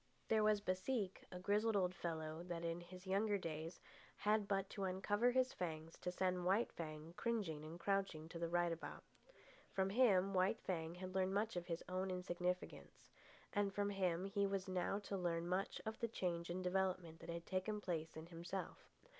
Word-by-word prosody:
There 220 -1 +5
was 210 -1 +4
Baseek, 195 +1 -1
a 180 - -5
grizzled 210 +4 +2
old 185 -2 +3
fellow 160 -3 -3
that 170 -1 -3
in 170 +1 -1
his 180 +2 -10
younger 200 +2 +2
days 165 -1 -4 0.4
had 210 -1 +3
but 195 -1 +1
to 195 - -2
uncover 205 +5 +2
his 255 +1 +3
fangs 160 -2 -3
to 180 - -2
send 180 0 +1
White 195 +6 +3
Fang 155 0 -6
cringing 200 -11 0
and 160 +3 -7
crouching 195 -4 0
to 170 - -6
the 170 0 0
right 175 0 +3
about. 165 - -5 0.7
From 190 0 +1
him 195 -5 +5
White 190 +4 +3
Fang 165 -2 -2
had 185 +1 -5
learned 190 0 +2
much 215 +1 +1
of 175 -1 -2
his 165 -1 -2
own 185 +1 -1
insignificance; 180 0 -3 0.4
and 200 -1 +1
from 205 0 +1
him 185 -2 +1
he 200 0 +2
was 195 0 -1
now 185 +1 +1
to 205 -1 -3
learn 170 -2 0
much 185 +2 0
of 220 0 -3
the 230 - +1
change 175 -6 -1
and 185 +2 -2
development 180 -3 0
that - - -9
had 170 0 -3
taken 195 +3 0
place 165 -5 -2
in 160 - -6
himself. 175 +2 -5
185 Hz, 190 wpm, -42 LUFS, 170-200 Hz, 0.7 s, There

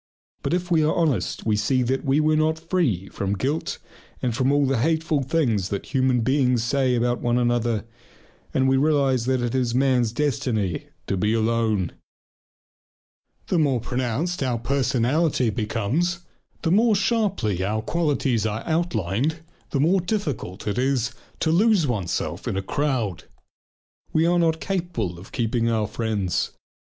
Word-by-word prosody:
But - - 0
if 180 0 -3
we 160 -2 +4
are 155 - +2
honest 150 - 0
we 110 -1 +2
see 125 +5 +1
that 130 +2 -1
we 140 0 +2
were 155 0 +3
not 155 +1 +2
free 160 - 0
from 100 +1 -2
guilt 145 +8 -2 0.4
and 120 -3 -1
from 130 +2 +2
all 145 0 +3
the 135 -3 +1
hateful 160 +1 +1
things 120 - 0
that 100 +7 -5
human 130 -2 +2
beings 125 -1 +2
say 130 +1 +1
about 120 +1 0
one 120 0 +1
another, 120 -3 +1 0.7
and 130 0 +2
we 135 0 +3
realize 135 -4 +2
that 130 -1 +1
it 120 - -1
is 125 -2 0
man's 125 -3 +2
destiny 115 - -1 0.2
to - - -1
be 105 +4 +1
alone. 110 -5 +1 1.5
The 180 - +1
more 140 -5 +2
pronounced 130 +9 -2
our 125 -3 0
individuality 130 +2 +1
becomes, 125 - -1 0.4
the 165 - +1
more 220 +3 +4
sharply 195 - 0
our 110 +3 -1
qualities 140 -9 0
are 110 +1 -3
outlined, 155 - -1 0.3
the 140 - -1
more 175 +6 +3
difficult 150 - -3
is 125 +3 +1
it - - -20 0.3
to 160 - +2
lose 200 0 +4
oneself 105 -10 -2
in - - -1
a 95 - -2
crowd. 120 - -1 0.9
We 160 +1 +2
are 175 +1 +3
not 160 -1 +2
capable 165 - -3
of 95 - -13
keeping 115 -2 0
our 110 -2 +1
friends. 105 -4 -2
130 Hz, 155 wpm, -24 LUFS, 110-155 Hz, 1.5 s, we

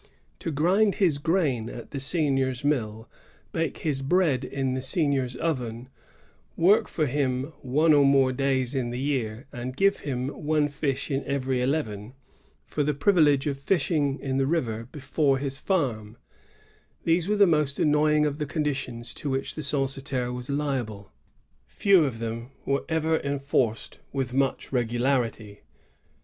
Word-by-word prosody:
To - - -3
grind 190 +8 +2
his 170 -8 +2
grain 145 -9 0
at 120 - -9
the 140 - -4
seignior's 135 -3 +2
mill, 110 -6 -1 0.4
bake 165 -2 -2
his 140 -4 0
bread 145 -3 +2
in 135 -1 -2
the 130 - -2
seignior's 135 -3 0
oven, 125 -6 -3 0.7
work 190 +6 +4
for 155 - -1
him 135 +1 -1
one 150 +4 +3
or 145 -1 +6
more 135 -1 +4
days 130 -1 0
in 130 -3 -1
the 120 - -4
year, 130 -3 -2
and 125 +2 -6
give 195 0 +3
him 130 -2 -3
one 150 0 0
fish 140 0 -2
in 135 0 -1
every 135 -2 -1
eleven, 125 -4 -2 0.5
for 150 - -3
the 145 0 0
privilege 145 -4 +3
of 140 -2 -2
fishing 145 -3 +1
in 135 -1 -2
the 135 0 +1
river 115 -8 -1
before 140 -1 0
his 135 0 -3
farm, 120 - -1 0.4
— - - -34
these 165 +1 +2
were 210 - +2
the 200 - +7
most 150 -5 +1
annoying 150 0 +3
of 150 0 -2
the 150 - -2
conditions 135 -6 -3
to 145 - -4
which 135 0 -2
the 155 - -5
censitaire 135 -3 -1
was 125 +1 -6
liable. 130 -9 -3 0.6
Few 195 -5 +4
of 130 -5 -3
them 115 +1 -5 0.2
were 140 0 +1
enforced 140 -7 0
with 135 -2 -3
much 135 0 0
regularity. 120 -3 -1
140 Hz, 155 wpm, -26 LUFS, 125-150 Hz, 0.7 s, the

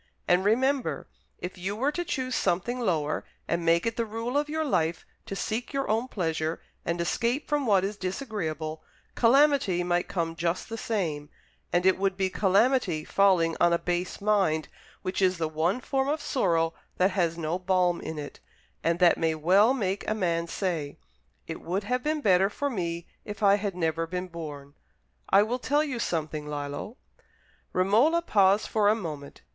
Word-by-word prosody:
And 180 +1 +4
remember, 260 +6 +1 0.3
if 180 +1 -7
you 190 +3 -3
were 265 +7 +1
to 350 +3 -2
choose 260 -6 -3
something 195 +6 0
lower, 160 -10 0 0.2
and 170 0 -1
make 165 +1 +3
it 230 +1 -2
the 230 - +1
rule 230 +4 -4
of 295 +1 +1
your 315 +1 -1
life 165 - 0 0.2
to 195 - -4
seek 225 +7 -3
your 275 0 -1
own 225 +4 0
pleasure 160 -6 -2 0.2
and 170 0 -2
escape 235 - 0
from 295 -3 0
what 195 -3 +4
is 200 +1 -3
disagreeable, 180 - -4 0.3
calamity 250 -7 +4
might 175 0 0
come 165 -3 -2
just 170 +2 -2
the 225 - -4
same; 165 -11 -2 0.4
and 175 +1 +1
it 190 0 +4
would 195 -1 0
be 190 -1 0
calamity 195 - +2
falling 185 -5 +3
on 175 0 +5
a - - +4
base 175 +1 -2
mind, 195 -7 +1 0.3
which 185 +1 -2
is 185 -1 +3
the 165 -1 -1
one 160 +8 0
form 265 +1 -1
of 300 +2 0
sorrow 170 - +1 0.2
that 185 +2 +3
has 170 -4 0
no 165 +2 -2
balm 180 -1 +1
in 160 - -5
it, 145 -1 -7 0.4
and 165 0 +2
that 175 -1 +4
may 160 -1 +1
well 190 +9 +4
make 200 -7 -1
a 215 - 0
man 170 -4 0
say, 165 -6 -3 0.5
'It - - -6
would 185 +4 -2
have 250 +4 -1
been 305 +2 -1
better 190 -4 +4
for 285 +7 -2
me 170 -5 -3 0.2
if 210 0 -7
I 200 -1 +6
had 200 -2 -3
never 165 -1 -1
been 180 +1 -4
born.' 145 -4 -8 0.6
I 195 +1 +6
will 240 +4 -2
tell 290 +4 +2
you 265 -6 -3
something, 155 -6 -2
Lillo." 145 - -5 0.7
Romola 230 - +3
paused 200 - +3
for 210 -2 +2
a 215 - +4
moment. 155 -9 -7
185 Hz, 180 wpm, -27 LUFS, 170-230 Hz, 0.7 s, I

